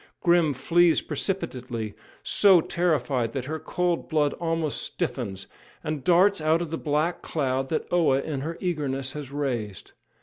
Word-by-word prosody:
] - - -53
Grim 170 -5 +4
flees 170 +5 +4
precipitately 125 - -3 0.3
so 195 -4 +5
terrified 145 -9 0
that 130 -2 -3
her 155 +3 -4
cold 175 +1 -1
blood 150 -2 +2
almost 165 -3 -1
stiffens 115 - -3 0.4
and 155 -3 -3
darts 185 +1 +4
out 155 +1 +3
of 170 -3 -4
the 165 - -2
black 155 +3 0
cloud 135 -3 -1
that 160 - -1
Oa 155 -6 +4
in 140 -1 -3
her 165 +4 -4
eagerness 140 -7 -2
has 145 -2 -7
raised. 120 -9 -3
155 Hz, 155 wpm, -26 LUFS, 135-170 Hz, 0.4 s, so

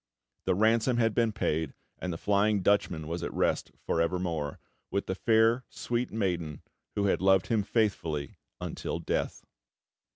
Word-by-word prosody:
The - - +3
ransom 115 +4 +3
had 115 -2 +3
been 115 0 +2
paid; 80 -7 -1 0.2
and 90 - -3
the 85 - -3
Flying 100 +1 +2
Dutchman 85 -6 +2
was 85 +1 -3
at - - -3
rest - - +1 0.2
for 85 - +1
evermore, 85 -4 -1 0.3
with 100 - -1
the 95 - -1
fair, 115 +4 +3
sweet 120 +1 -2
maiden 90 -8 -2 0.3
who 100 - +1
had 95 - +2
loved 95 -1 +5
him 110 -2 +3
faithfully 95 - -1 0.2
until - - -3
death! - - -2
100 Hz, 155 wpm, -29 LUFS, 85-110 Hz, 0.3 s, loved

